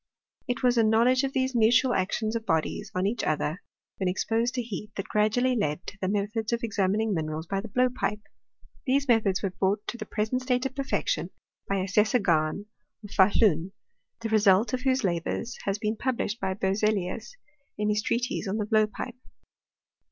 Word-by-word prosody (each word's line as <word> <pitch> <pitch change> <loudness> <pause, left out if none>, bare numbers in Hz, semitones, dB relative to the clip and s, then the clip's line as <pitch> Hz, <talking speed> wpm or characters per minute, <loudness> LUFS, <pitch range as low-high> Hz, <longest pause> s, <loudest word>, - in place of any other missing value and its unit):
It 245 +1 -2
was 245 -1 +4
a - - +5
know 220 +1 +4
ledge 255 +2 +3
of 270 - 0
these 260 0 0
mutual 240 +2 +4
actions 215 +4 -1
of 230 - -2
bodies 160 -6 -1
on 185 +1 +1
each 215 +3 -1
other, 155 +3 -1 0.4
when 190 - -1
exposed 225 +6 0
to 245 - -1
heat, 210 -1 -6
that 195 - -4
gradually 230 +5 +2
led 150 -7 -1
to 200 - -8
the 185 - 0
me 200 +1 +1
thods 215 +1 -3
of 235 0 -1
examining 210 0 +1
minerals 155 -1 -3
by 195 +3 -2
the 225 - -7
blowpipe. 245 -2 0 0.7
These 275 +2 +2
methods 215 -6 +2
were 195 - 0
brought 200 +3 0
to 240 - -5
the 215 - -6
present 220 +4 -1
state 255 0 0
of 270 - -2
perfection 275 - -1 0.4
by 195 - 0
Assessor 210 +6 +2
Gahn, 170 -2 +1 0.4
of 205 - -10
Fahluji, 190 -3 +3 0.5
the 225 - -3
[result 210 +1 +4
of 255 - -1
whose 260 -1 +1
la 175 -3 +1
bours 230 +7 -4
has 195 0 0
been 215 +1 -1
published 240 -3 -2
by 190 -1 -1
Berzelius, 205 - -1 0.4
in 210 0 0
his 210 0 +1
treatise 245 +1 -1
on 195 +3 -1
the 210 - -1
blowpipe. 215 +3 0
215 Hz, 190 wpm, -27 LUFS, 195-240 Hz, 0.7 s, a